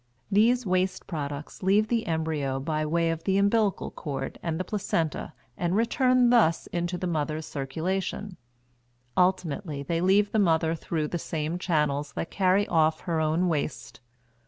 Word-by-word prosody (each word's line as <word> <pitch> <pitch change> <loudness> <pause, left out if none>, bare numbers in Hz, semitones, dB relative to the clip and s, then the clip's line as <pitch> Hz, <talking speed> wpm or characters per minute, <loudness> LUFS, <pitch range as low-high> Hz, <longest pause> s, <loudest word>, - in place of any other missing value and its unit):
These 235 +4 +4
waste 185 0 0
products 145 -3 -5
leave 200 +3 +3
the 230 0 0
embryo 155 -5 -1
by 155 +2 -1
way 165 +1 +1
of 165 0 -4
the 195 -1 +1
umbilical 200 0 +2
cord 135 -3 -5
and 165 -1 -2
the - - 0
placenta 170 -6 -2 0.2
and 175 +1 -1
return 250 +2 +3
thus 195 -9 +4
into 175 0 -2
the 180 - -4
mother's 155 -2 -2
circulation; 180 +7 -3 0.8
ultimately 180 -4 0
they 165 +4 -1
leave 200 +3 +3
the 220 - +2
mother 165 -4 +3
through 160 -2 -2
the 175 - -2
same 160 +2 -3
channels 150 -5 0
that 165 - -4
carry 195 +1 +2
off 160 -1 +2
her 165 -2 -1
own 160 +4 +1
waste. 145 -7 -3
170 Hz, 155 wpm, -27 LUFS, 155-195 Hz, 0.8 s, These